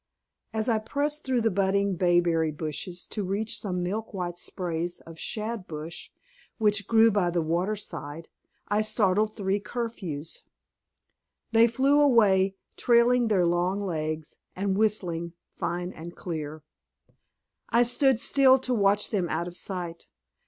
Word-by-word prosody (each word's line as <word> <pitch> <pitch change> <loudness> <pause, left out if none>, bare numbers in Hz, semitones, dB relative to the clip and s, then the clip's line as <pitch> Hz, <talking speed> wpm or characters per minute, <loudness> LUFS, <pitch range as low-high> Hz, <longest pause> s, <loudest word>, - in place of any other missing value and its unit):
As 220 0 -2
I 225 -3 +2
pressed 290 +7 -2
through 255 -2 +1
the 225 -1 +2
budding 200 0 +1
bayberry 175 -2 +2
bushes 160 +4 -5
to 210 - -4
reach 200 +4 -1
some 180 -3 -2
milk 210 +4 -4
white 175 -2 -4
sprays 175 -2 -3
of 165 -1 -13
shadbush 185 -8 -5 0.5
which 210 -2 +2
grew 225 0 +5
by 195 -4 +1
the 170 -1 0
water 175 +6 0
side, 165 -6 -6 0.4
I 210 +1 +1
startled 215 -1 +1
three 195 -1 0
curfews. 200 -9 -5 1.1
They 230 +1 +6
flew 270 +5 +3
away, 200 -8 +4 0.2
trailing 240 0 +4
their 195 -5 +3
long 175 +3 +1
legs, 155 -2 -4 0.2
and 195 0 -1
whistling 180 -6 0 0.2
fine 175 +2 -3
and 170 +2 -9
clear. 155 -3 -6 1.1
I 235 +1 +4
stood 255 0 +3
still 270 0 +6
to 255 -1 -2
watch 205 -2 +2
them 185 -6 0
out 170 +2 -2
of 175 - -8
sight. 175 -3 -3
195 Hz, 140 wpm, -27 LUFS, 175-225 Hz, 1.1 s, They